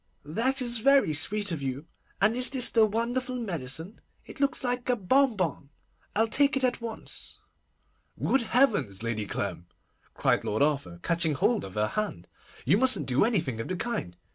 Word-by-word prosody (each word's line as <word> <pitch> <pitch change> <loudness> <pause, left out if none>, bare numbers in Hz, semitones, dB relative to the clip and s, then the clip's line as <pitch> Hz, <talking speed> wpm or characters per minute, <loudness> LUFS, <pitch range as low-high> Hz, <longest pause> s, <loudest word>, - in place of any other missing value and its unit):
That 255 - 0
is 240 -1 +2
very 275 - +4
sweet 205 +6 +1
of 160 -4 -3
you. 135 +2 -4 0.3
And 210 +4 +3
is 250 +1 +3
this 260 -2 +3
the 225 -2 +5
wonderful 240 +4 -2
medicine? 170 - -5 0.2
It - - -11
looks 280 0 0
like 245 0 -2
a 250 - +3
bonbon. 200 - +1 0.5
I'll 225 +2 +3
take 280 +5 +3
it 265 - -2
at 250 -1 0
once.' 230 -1 -6 0.8
'Good 270 - +2
heavens! 205 - +1
Lady 110 -3 -2
Clem,' 90 -4 -4 0.5
cried - - +1
Lord 110 +6 0
Arthur, 140 - -1
catching 170 -3 +1
hold 220 +9 +1
of 95 - -9
her 105 0 0
hand, 210 - -4 0.4
'you 195 - +4
mustn't 260 - +2
do 130 +1 +2
anything 170 - 0
of - - -6
the 185 - -3
kind. 175 - -4
205 Hz, 170 wpm, -28 LUFS, -, 0.8 s, the